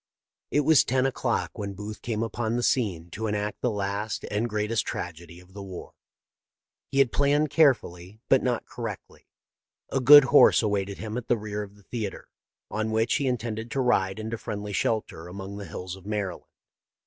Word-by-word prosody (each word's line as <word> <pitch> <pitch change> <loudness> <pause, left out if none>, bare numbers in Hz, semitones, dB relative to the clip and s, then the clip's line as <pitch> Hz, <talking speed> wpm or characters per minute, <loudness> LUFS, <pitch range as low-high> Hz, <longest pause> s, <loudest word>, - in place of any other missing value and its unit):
It 145 - +2
was 155 0 +5
ten 130 +1 +1
o'clock 125 -4 -1
when 100 -1 -4
Booth 105 +2 -7
came 115 -2 -2
upon 115 0 -2
the 120 - -1
scene 90 -11 0
to 110 +5 -3
enact 105 0 -2
the 125 - +1
last 100 0 -3
and 110 +3 0
greatest 105 +1 0
tragedy 85 0 -6
of 90 +1 -19
the 100 - -8
war. 95 -2 -9 1.0
He 135 - -4
had 135 -4 +4
planned 145 +1 +2
carefully, 110 - +2
but 135 - +5
not 125 -2 -1
correctly. 115 -4 -8 0.6
A 135 - +1
good 145 +3 +10
horse 140 -3 +6
awaited 100 -2 -1
him 110 +1 -5
at 125 - -5
the 120 - +2
rear 105 -1 -4
of 100 -1 -9
the 100 - -20
theatre, 110 -2 -5 0.4
on 110 +1 -1
which 110 +1 +1
he 140 - -1
intended 115 -2 -3
to 135 - -2
ride 100 -7 +2
into 110 +1 -4
friendly 105 0 -5
shelter 100 -5 -1
among 95 +2 -7
the 100 - -6
hills 90 0 -6
of 95 0 -14
Maryland. 105 -4 -3
110 Hz, 185 wpm, -26 LUFS, 100-120 Hz, 1.0 s, good